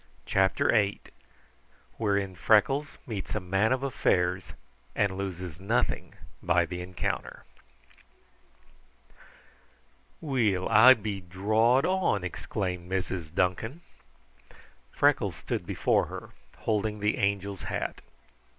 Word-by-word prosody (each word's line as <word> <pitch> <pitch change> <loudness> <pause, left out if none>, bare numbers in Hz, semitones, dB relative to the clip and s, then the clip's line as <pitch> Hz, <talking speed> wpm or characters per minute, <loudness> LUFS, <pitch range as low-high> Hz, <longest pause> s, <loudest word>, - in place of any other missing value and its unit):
CHAPTER 95 +9 +2
VIII 100 -3 +2 1.0
Wherein 100 -3 0
Freckles 135 +10 +2
Meets 110 -4 -5
a - - 0
Man 95 +4 +1
of 130 +1 0
Affairs 90 -8 0 0.4
and 100 -2 +1
Loses 90 -4 -5
Nothing 105 +5 -1 0.3
by 85 -1 +2
the 90 +1 -6
Encounter 90 0 -4 2.8
"Weel, 115 - 0
I 130 +4 +8
be 105 -3 -4
drawed 110 +8 +2
on!" 185 - +1
exclaimed 90 0 -4
Mrs. 90 -4 -3
Duncan. 110 - -1 1.1
Freckles - - +2
stood - - -4
before - - +1
her, - - -8 0.3
holding 105 -1 -1
the 105 +1 0
Angel's 100 -1 -1
hat. - - -4
100 Hz, 100 wpm, -28 LUFS, 90-110 Hz, 2.8 s, I